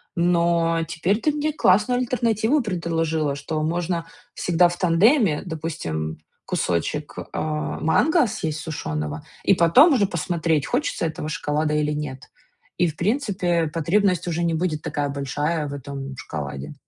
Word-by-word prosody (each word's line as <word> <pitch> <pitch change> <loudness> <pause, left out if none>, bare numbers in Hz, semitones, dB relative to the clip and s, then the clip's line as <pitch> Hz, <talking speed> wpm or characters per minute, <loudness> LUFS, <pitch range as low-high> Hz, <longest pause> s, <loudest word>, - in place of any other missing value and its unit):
Но 170 -1 +2
теперь 175 +6 0
ты 305 - +2
мне 300 +1 -1
классную 210 0 +3
альтернативу 240 +2 +1
предложила, 165 - -1
что 155 +2 -3
можно 170 +1 -1 0.3
всегда 175 0 +3
в 175 - -6
тандеме. 185 - +3
Допустим, 85 - -4 0.3
кусочек, 120 - -2 0.2
а, 155 -1 -3
манго 300 - +3
съесть 160 -8 -3
сушёного, 75 - -4 0.2
и - - +5
потом 195 - +6
уже 210 -7 +3
посмотреть, 165 -3 0
хочется 245 - -1
этого 155 -1 -4
шоколада 150 -1 -1
или 150 0 +1
нет. 150 -3 -5 0.5
И, 175 - +3
в 155 - -4
принципе, 185 - 0
потребность 180 +4 +1
уже 170 0 -1
не 170 -1 +1
будет 160 -2 -1
такая 145 -1 -2
большая 145 +3 -2
в 140 - -6
этом 140 -1 -6
шоколаде. 70 - -6
165 Hz, 140 wpm, -23 LUFS, 150-185 Hz, 0.5 s, потом